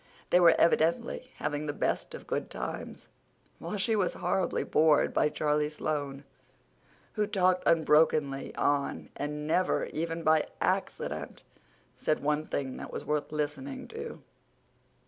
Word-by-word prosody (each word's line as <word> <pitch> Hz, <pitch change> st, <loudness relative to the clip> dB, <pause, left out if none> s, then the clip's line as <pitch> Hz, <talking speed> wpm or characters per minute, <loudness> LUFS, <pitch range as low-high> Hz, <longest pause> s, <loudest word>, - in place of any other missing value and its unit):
They 180 Hz, -, +6 dB
were 170 Hz, -2 st, +7 dB
evidently 170 Hz, +10 st, +2 dB
having 150 Hz, 0 st, -3 dB
the 145 Hz, -, -1 dB
best -, -, -1 dB
of -, -, -10 dB
good -, -, -2 dB
times, -, -, -6 dB, 0.5 s
while 210 Hz, -, -4 dB
she 220 Hz, +3 st, +1 dB
was 195 Hz, -4 st, +1 dB
horribly 190 Hz, -2 st, 0 dB
bored 155 Hz, -1 st, +3 dB
by 150 Hz, -, +3 dB
Charlie 150 Hz, 0 st, 0 dB
Sloane, 145 Hz, -2 st, -3 dB, 0.9 s
who 210 Hz, -2 st, 0 dB
talked 185 Hz, -2 st, +2 dB
unbrokenly 150 Hz, -3 st, +3 dB
on, 145 Hz, -1 st, 0 dB
and 150 Hz, +1 st, -4 dB
never, 180 Hz, +4 st, +1 dB
even 165 Hz, +1 st, -2 dB
by 155 Hz, -1 st, +3 dB
accident, -, -, -2 dB, 0.5 s
said 155 Hz, -, 0 dB
one 150 Hz, +1 st, 0 dB
thing 135 Hz, -2 st, -3 dB
that -, -, -7 dB
was -, -, -5 dB
worth 150 Hz, 0 st, -1 dB
listening 155 Hz, -, -3 dB
to. 455 Hz, +1 st, -7 dB
155 Hz, 135 wpm, -30 LUFS, 150-180 Hz, 0.9 s, were